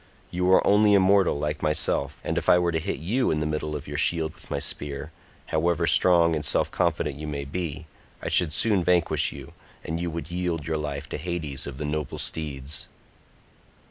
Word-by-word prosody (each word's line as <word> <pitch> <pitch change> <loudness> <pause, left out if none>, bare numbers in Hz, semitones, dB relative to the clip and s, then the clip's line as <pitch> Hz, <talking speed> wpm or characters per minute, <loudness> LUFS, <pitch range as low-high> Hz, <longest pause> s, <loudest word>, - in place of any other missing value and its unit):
You 90 +1 0
are - - +5
only 105 0 +5
a - - +6
mortal 95 -4 +3
like 75 +1 -3
myself, 75 -2 0
and - - -2
if - - 0
I - - +7
were 90 -1 +1
to 80 - 0
hit - - -3
you 110 - 0
in 75 - +1
the 75 - -1
middle 75 0 -2
of 75 0 -6
your 75 +1 -3
shield 80 -1 +2
with - - -14
my - - -2
spear, 75 +2 -3 0.4
however 85 +1 +2
strong 85 -2 +4
and 75 - -3
self - - +1
confident 70 - 0
you 75 +1 -6
may 70 -2 -4
be, 80 +1 -4 0.3
I - - -6
should 85 -4 +3
soon 100 +2 +3
vanquish 90 -1 +2
you, - - -10 0.3
and 80 +1 -3
you 85 0 -2
would 85 0 -6
yield 85 -3 -2
your 80 -1 -1
life 75 -2 -4
to - - -4
Hades 75 -5 -3
of 70 -2 -7
the 75 - -4
noble 75 -1 -3
steeds." 75 -2 -3
80 Hz, 205 wpm, -25 LUFS, 75-85 Hz, 0.4 s, I